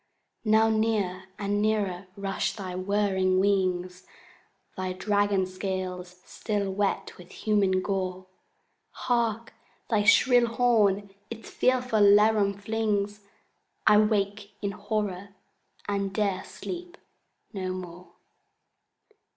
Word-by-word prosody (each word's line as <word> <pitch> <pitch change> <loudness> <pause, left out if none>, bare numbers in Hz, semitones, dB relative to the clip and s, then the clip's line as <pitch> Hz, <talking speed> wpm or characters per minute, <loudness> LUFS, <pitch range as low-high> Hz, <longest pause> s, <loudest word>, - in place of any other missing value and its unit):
Now 220 +1 +4
near 215 -4 0
and 205 0 -1
nearer 200 -4 -1
rush 195 -1 -2
thy 190 -4 -6
whirring 190 -1 +1
wings, 185 -2 0 0.7
Thy 185 0 -3
dragon 205 0 +1
scales 185 -1 -5
still 205 -3 -3
wet 195 0 -1
with 180 - -13
human 195 -3 +1
gore. 185 -2 -3 0.7
Hark, 230 -2 -1 0.4
thy 215 -2 +3
shrill 245 +3 +5
horn 215 -4 +2 0.2
its 225 -1 -9
fearful 250 -4 +1
laram 205 0 +5
flings! 210 -1 -1 0.7
—I 210 - +7
wake 205 -1 0
in 200 -1 -2
horror, 200 -1 -4 0.5
and 200 -1 -1
'dare 200 -3 -1
sleep 355 +1 -8 0.6
no 190 -2 -3
more! 180 -1 -8
200 Hz, 100 wpm, -27 LUFS, 185-215 Hz, 0.7 s, I